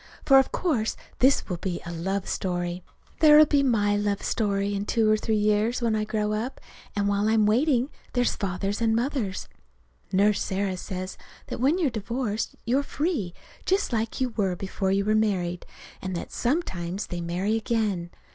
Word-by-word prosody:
For 270 -1 +8
of 265 - +1
course 260 -12 0 0.2
this 265 +2 +4
will 180 - -3
be 175 0 -3
a 170 - -5
love 190 +4 -2
story. 175 -1 -2 0.4
There'll 305 -1 +8
be 285 -1 +2
my 210 -6 +2
love 205 -1 -1
story 200 -2 0
in 200 +1 -3
two 225 -2 +2
or 215 - +5
three 215 0 0
years, 210 +3 +2
when 230 -3 +1
I 215 0 0
grow 210 0 -1
up, 235 +5 -3 0.4
and 200 0 +1
while 205 +1 +1
I'm 220 -1 +4
waiting 255 +4 +2 0.2
there's 245 -1 +1
Father's 195 +2 -2
and 225 -1 +3
Mother's. 235 -6 -2 0.6
Nurse 200 +2 +3
Sarah 190 -1 -1
says 185 0 -6 0.3
that - - -4
when 280 +8 +3
you're 320 -8 +1
divorced 225 0 -3
you're 255 +4 +2
free, 285 - -2 0.3
just 385 -7 +1
like 225 0 -1
you 260 -1 +1
were 195 -5 -1
before 190 +1 -2
you 195 +1 +1
were 215 - +2
married, 185 -5 0 0.3
and 185 -1 -4
that 170 - -5
sometimes 195 - -2
they 175 -1 -5
marry 180 +6 -1
again. 215 -6 -1
210 Hz, 175 wpm, -26 LUFS, 195-240 Hz, 0.6 s, For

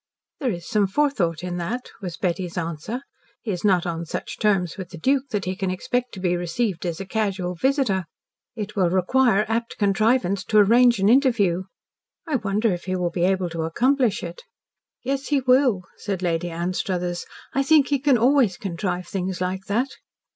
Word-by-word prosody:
"There 265 - 0
is 170 -5 -5
some 210 -2 +2
forethought 190 - 0
in 180 -1 -3
that," 225 +9 -4
was 180 -4 -5
Betty's 180 -1 -2
answer. 170 - -4 0.4
"He 220 - -2
is 180 -2 -4
not 185 -4 +3
on 170 -1 -3
such 165 - -5
terms 190 -6 +1
with 190 -3 -7
the 170 - -9
Duke 270 - +1
that 210 -5 -2
he 185 +1 -2
can 190 0 -2
expect 245 +7 -2
to - - -7
be 180 -1 +1
received 175 +1 -2
as 165 -2 -3
a 195 - -5
casual 195 -3 -1
visitor. 220 - +1 0.5
It 210 -2 -5
will 185 -4 +3
require 210 +4 +3
apt 230 +1 -2
contrivance 200 -1 +2
to 215 - +2
arrange 235 +3 +6
an 195 0 +2
interview. 215 -8 +3 0.6
I 300 -4 +1
wonder 210 -1 0
if 175 - -6
he 185 0 -1
will 180 -1 -1
be 175 0 +1
able 185 -2 +1
to 165 -1 -3
accomplish 240 - +1
it?" 485 - -7 0.6
"Yes, 270 +1 -2
he 290 -2 +2
will," 255 -6 +3
said 195 -3 -4
Lady 175 0 0
Anstruthers. 175 +1 -2 0.3
"I 275 - +2
think 290 0 +4
he 285 -1 +2
can 275 -2 +4
always 240 -5 +3
contrive 180 -1 -3
things 185 -1 -3
like 185 +1 -2
that." 235 +6 0
195 Hz, 185 wpm, -23 LUFS, 180-240 Hz, 0.6 s, arrange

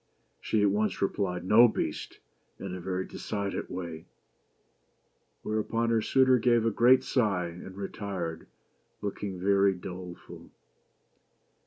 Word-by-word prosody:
She 105 -2 0
at 100 - +4
once 105 +1 0
re 100 - +3
plied, 90 -3 -3
"No, 115 +5 +7
Beast!" 110 - -4 0.4
in - - -6
a 90 - -5
very 95 +1 -2
decided 100 -2 -4
way; 85 -3 -6 1.4
whereupon 115 +2 -1
her 115 -1 +3
suitor 130 +1 +4
gave 120 -1 +3
a 115 - +2
great 125 +4 +5
sigh, 100 -10 0
and 90 +3 -10
retired, 95 -5 -5 0.6
looking 100 -2 -4
very 100 +1 +3
doleful. 90 0 -9
100 Hz, 125 wpm, -29 LUFS, 90-110 Hz, 1.4 s, No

